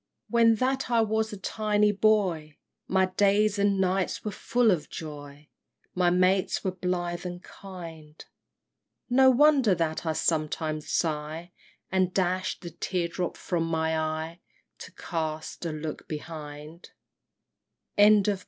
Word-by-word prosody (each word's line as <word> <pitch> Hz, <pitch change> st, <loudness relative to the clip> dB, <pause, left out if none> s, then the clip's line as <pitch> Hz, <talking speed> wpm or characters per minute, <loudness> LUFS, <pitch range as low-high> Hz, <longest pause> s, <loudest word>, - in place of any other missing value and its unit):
XVII. -, -, -57 dB
When 230 Hz, -1 st, +5 dB
that 260 Hz, +3 st, -1 dB
I 235 Hz, -1 st, +3 dB
was 220 Hz, 0 st, 0 dB
a 205 Hz, -, -6 dB
tiny 210 Hz, +1 st, +1 dB
boy 190 Hz, -8 st, +1 dB, 0.3 s
My 190 Hz, 0 st, +3 dB
days 205 Hz, +1 st, +3 dB
and 200 Hz, -1 st, +2 dB
nights 190 Hz, +2 st, 0 dB
were 210 Hz, -, -2 dB
full 240 Hz, +2 st, +2 dB
of 155 Hz, -5 st, -1 dB
joy, 145 Hz, -2 st, -9 dB, 0.5 s
My 180 Hz, -1 st, +2 dB
mates 185 Hz, +2 st, +2 dB
were 190 Hz, -, 0 dB
blithe 180 Hz, -1 st, -3 dB
and 180 Hz, 0 st, -6 dB
kind! 165 Hz, -5 st, -11 dB, 0.9 s
No 260 Hz, +1 st, +6 dB
wonder 265 Hz, -5 st, +5 dB
that 160 Hz, -2 st, -2 dB
I 160 Hz, -2 st, -1 dB
sometimes 155 Hz, -1 st, -1 dB
sigh, 160 Hz, +1 st, -2 dB, 0.4 s
And 185 Hz, -1 st, +1 dB
dash 185 Hz, 0 st, 0 dB
the 170 Hz, -2 st, -7 dB
tear 175 Hz, +1 st, -2 dB
drop 175 Hz, 0 st, -3 dB
from 170 Hz, -2 st, -2 dB
my 160 Hz, 0 st, 0 dB
eye, 160 Hz, +2 st, -3 dB, 0.4 s
To -, -, -10 dB
cast 160 Hz, 0 st, -4 dB
a -, -, -3 dB
look 155 Hz, 0 st, -6 dB
behind! 155 Hz, +1 st, -8 dB, 1.1 s
BALLAD. 205 Hz, -1 st, +5 dB
180 Hz, 135 wpm, -27 LUFS, 160-205 Hz, 1.1 s, No